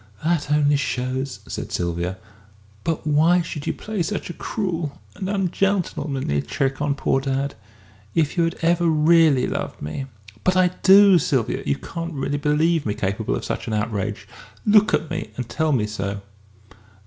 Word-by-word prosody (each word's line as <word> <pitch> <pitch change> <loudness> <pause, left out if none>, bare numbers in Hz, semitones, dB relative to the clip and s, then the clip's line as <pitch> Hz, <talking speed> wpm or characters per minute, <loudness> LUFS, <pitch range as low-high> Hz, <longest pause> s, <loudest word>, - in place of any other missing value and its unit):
"That 160 -3 0
only 145 -1 +4
shows!" 130 0 -2
said - - -5
Sylvia. 85 +1 -2 0.7
"But 165 -2 -2
why 160 +4 +4
should 150 -3 -6
you - - +1
play 215 -3 -4
such 185 +1 -2
a - - -7
cruel, 170 -10 -3 0.2
and 190 - -4
and 200 -1 0
ungentlemanly 155 - 0
trick 135 - -2
on 145 -1 +1
poor 135 -1 +1
dad? 135 +1 -1 0.6
If 155 -3 +1
you 170 - +3
had 165 - -2
ever 170 +1 +3
really 155 -3 +4
loved - - -4
me 130 - -5 0.2
!" 105 +1 -20
"But 185 0 +2
I 185 -1 +5
do, 195 -1 +7
Sylvia, 130 -5 0
you 70 - +2
can't 165 - -6
really 140 +1 -2
believe 155 +2 +2
me 105 -2 -2
capable 100 +1 -1
of - - -4
such - - -4
an 110 - -2
outrage! 105 -2 -2 0.4
Look 210 0 +5
at 160 - -4
me - - -3
and 125 -2 -3
tell 155 +3 0
me 120 -7 +2
so." 100 -1 -4
150 Hz, 170 wpm, -22 LUFS, 125-170 Hz, 0.7 s, do